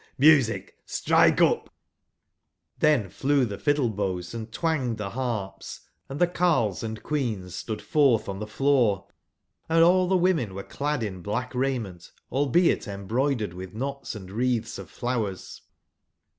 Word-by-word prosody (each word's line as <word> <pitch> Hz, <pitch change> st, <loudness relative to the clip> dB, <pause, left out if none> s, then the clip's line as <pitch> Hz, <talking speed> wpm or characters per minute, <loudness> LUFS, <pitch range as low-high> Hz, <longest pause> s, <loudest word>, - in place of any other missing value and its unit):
jVIusic, 140 Hz, -6 st, +4 dB
strike -, -, +3 dB
upt -, -, +3 dB, 0.6 s
" -, -, -45 dB
tlhen 130 Hz, -11 st, +3 dB
flew 140 Hz, -1 st, +2 dB
the 100 Hz, -3 st, -6 dB
fiddle/bows 105 Hz, -, -1 dB
and 115 Hz, -1 st, -6 dB
twanged 140 Hz, -7 st, -1 dB
the 100 Hz, -2 st, -4 dB
harps, 110 Hz, -6 st, -4 dB, 0.3 s
and 135 Hz, +2 st, -5 dB
the 175 Hz, -, +6 dB
carles 165 Hz, -, +1 dB
and 110 Hz, -1 st, -5 dB
queens 110 Hz, -, -2 dB
stood 105 Hz, +3 st, -5 dB
forth 135 Hz, -8 st, +3 dB
on 95 Hz, 0 st, -4 dB
43 105 Hz, +5 st, -5 dB, 1.0 s
tbcfioor;<&aU 175 Hz, +3 st, +5 dB
the 190 Hz, -, +4 dB
women 165 Hz, -, +1 dB
were 100 Hz, -, -5 dB
clad 145 Hz, -3 st, -2 dB
in 95 Hz, -4 st, -5 dB
black 110 Hz, +8 st, -3 dB
raiment, 120 Hz, -10 st, -2 dB, 0.2 s
albeit 145 Hz, +6 st, +2 dB
embroidered 110 Hz, +3 st, -1 dB
witb 90 Hz, +2 st, -9 dB
knots 135 Hz, +1 st, -4 dB
and 95 Hz, -3 st, -9 dB
wreatbs 115 Hz, 0 st, -1 dB
of -, -, -9 dB
flow 120 Hz, -3 st, -1 dB
ers. 95 Hz, -2 st, -9 dB
120 Hz, 140 wpm, -26 LUFS, 100-145 Hz, 1.0 s, the